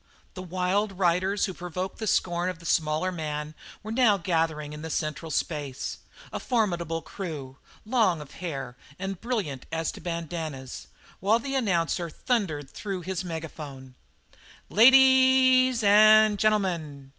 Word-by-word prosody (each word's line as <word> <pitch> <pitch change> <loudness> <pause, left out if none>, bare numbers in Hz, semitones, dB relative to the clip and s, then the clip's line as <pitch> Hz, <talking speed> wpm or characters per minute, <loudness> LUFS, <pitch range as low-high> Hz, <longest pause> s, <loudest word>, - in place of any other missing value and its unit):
The 185 - -7
wild 185 +3 -1
riders 185 +2 +1
who 190 - -5
provoked 180 +2 -5
the 220 - -3
scorn 175 -1 +1
of 180 - -5
the 170 - -15
smaller 155 +3 +1
man 150 -3 -4 0.3
were 215 - -6
now 225 -4 +4
gathering 160 -4 -1
in 150 - -8
the 160 - -6
central 155 +1 -3
space; 145 -4 -3 0.3
a - - -3
formidable 175 - -1
crew, 145 -9 -7 0.3
long 215 -8 +2
of 150 -2 -10
hair 135 -8 -5 0.2
and 195 -1 -5
brilliant 200 - -3
as 160 0 -1
to - - -12
bandannas, 165 -6 -5 0.3
while 205 +4 +3
the 270 +4 -5
announcer 175 -8 0
thundered 160 - -2
through 195 -3 -5
his 185 +1 -4
megaphone: 150 -6 -7 0.8
"La 215 - +1
a - - +11
a 260 -1 +6
dies 240 -3 -3
and 215 0 +6
gen'l'mun! 170 -10 0
180 Hz, 145 wpm, -26 LUFS, 155-210 Hz, 0.8 s, a